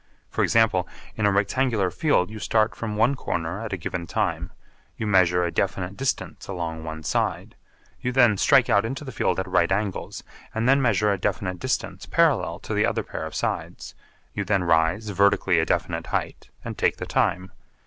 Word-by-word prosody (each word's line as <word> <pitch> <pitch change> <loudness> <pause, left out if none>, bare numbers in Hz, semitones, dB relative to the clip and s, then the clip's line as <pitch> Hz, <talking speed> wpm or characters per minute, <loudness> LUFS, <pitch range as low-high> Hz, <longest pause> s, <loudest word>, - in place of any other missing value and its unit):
For - - -1
example, 105 -6 +3 0.3
in 105 -2 +1
a - - +3
rectangular 105 0 +1
field 110 - +1
you 110 - -7
start 110 +1 +1
from 110 -2 -5
one 115 +6 +3
corner 85 -6 -3
at 115 - -5
a 95 - -2
given 85 0 -5
time, - - -1 0.5
you - - -3
measure 90 -3 +3
a 85 - -1
definite 95 +1 -2
distance 135 +3 -3
along 85 -4 -4
one 80 0 -6
side, - - -1 0.5
you 125 - -1
then 120 -4 +5
strike 135 +4 +4
out 105 -4 +3
into 135 +6 -4
the 130 - -6
field 115 - 0
at 95 - -3
right 85 -1 +2
angles, 100 -1 -2 0.3
and 115 +2 0
then 135 +1 +5
measure 105 -4 +2
a 100 - -4
definite 95 -2 -2
distance 110 -7 -3
parallel 145 - +2
to 110 - -5
the 105 +1 +2
other - - 0
pair - - -5
of - - -10
sides, - - -3 0.4
you 100 - -2
then 100 -1 +1
rise 85 +5 +2
vertically 95 -2 +3
a 80 - 0
definite - - -1
height - - -3 0.2
and - - -6
take - - +2
the - - -5
time. 90 +1 0
100 Hz, 190 wpm, -24 LUFS, 90-115 Hz, 0.5 s, then